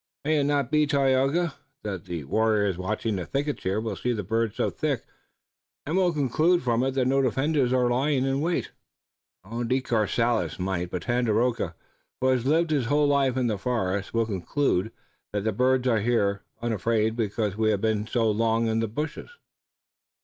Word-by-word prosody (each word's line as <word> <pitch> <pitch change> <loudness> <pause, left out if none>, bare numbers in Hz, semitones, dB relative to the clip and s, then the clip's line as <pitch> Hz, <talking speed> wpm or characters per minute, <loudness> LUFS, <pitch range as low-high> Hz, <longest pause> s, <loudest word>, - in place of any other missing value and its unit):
"May 155 0 +2
it 140 - +1
not 140 -2 0
be, 150 -1 +3
Tayoga, 140 +3 +2 0.3
that 95 -3 -5
the 85 -4 -5
warriors 105 +4 +1
watching 105 +3 -2
the 90 - -4
thickets 145 +1 -2
here 95 +3 -1
will 110 -2 -3
see 125 +5 -1
the 105 -3 -3
birds 115 +2 -1
so - - 0
thick, - - -2 0.8
and 155 - -2
will 185 -2 +3
conclude 155 +4 +2
from 120 -1 +1
it 130 0 -1
that 130 -2 +2
no 135 +2 +3
defenders 135 +1 +1
are 125 -1 +3
lying 130 +2 +1
in 135 +1 0
wait?" 170 +2 -1 1.0
"De 130 +3 +2
Courcelles 115 - 0
might, 90 -1 -2
but 90 -1 -4
Tandakora, 120 -6 0 0.4
who 130 - +1
has 130 -1 +1
lived 160 +2 +2
his 140 -6 +1
whole 145 +1 +3
life 135 -2 +2
in 130 - +1
the 110 -4 -1
forest, 100 -5 -1
will 115 0 +1
conclude 105 - -1 0.4
that 105 -1 -1
the 110 - +1
birds 130 +3 +2
are 115 -3 +3
here, 100 -3 +1 0.2
unafraid, 110 0 0
because 105 -3 -1
we 110 0 +1
have 105 -2 +1
been 110 -1 0
so 115 -2 +1
long 115 +1 +1
in 110 0 +1
the 115 - 0
bushes." 150 +8 -5
120 Hz, 180 wpm, -26 LUFS, 105-135 Hz, 1.0 s, be